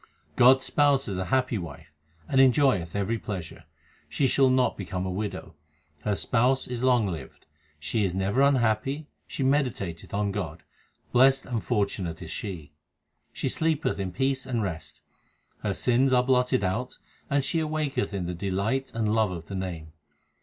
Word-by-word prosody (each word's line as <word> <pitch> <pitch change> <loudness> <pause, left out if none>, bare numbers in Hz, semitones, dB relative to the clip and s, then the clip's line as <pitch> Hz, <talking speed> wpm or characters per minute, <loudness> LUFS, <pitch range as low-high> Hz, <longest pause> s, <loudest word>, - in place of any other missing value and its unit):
God 130 +2 +7
s - - -4
spouse 140 -2 +2
is 95 -3 -3
a 95 - -2
happy 130 -1 +1
wife, 85 -1 -9 0.4
and 135 - +4
enjoyeth 125 - +3
every 100 +3 -1
pleasure; 90 -7 -6 0.4
She 140 - 0
shall 135 +1 +4
not 130 -1 +2
become 95 -2 -4
a 95 - -2
widow; 95 -3 -4 0.5
her 105 +3 0
Spouse 125 +6 +1
is 125 0 -4
long 125 -4 +4
lived. 80 -8 -7 0.3
She 105 +9 -1
is 95 -2 -1
never 100 +7 +1
unhappy, 135 +1 +2 0.2
she 135 - -3
meditateth 125 - -1
on 100 0 0
God; - - -5 0.5
blest 130 +2 +4
and 120 -3 -3
fortunate 100 -7 -1
is 85 -2 -8
she. 80 -9 -6 0.6
She - - -3
sleepeth 160 -7 0
in 95 -2 -2
peace 130 +6 -1
and 120 -4 -1
rest; 80 -5 -5 0.6
her 100 -2 -2
sins 125 +6 +2
are 125 0 +5
blotted 125 -1 +2
out, 110 +7 -2 0.3
and 140 -1 +2
she 165 - 0
awaketh 155 -9 -1
in 95 -3 -3
the 90 - -3
delight 100 +9 -1
and 110 -2 0
love 110 -3 +3
of 85 -3 -6
the 100 - -7
Name. 85 -5 -5
110 Hz, 165 wpm, -27 LUFS, 95-130 Hz, 0.6 s, God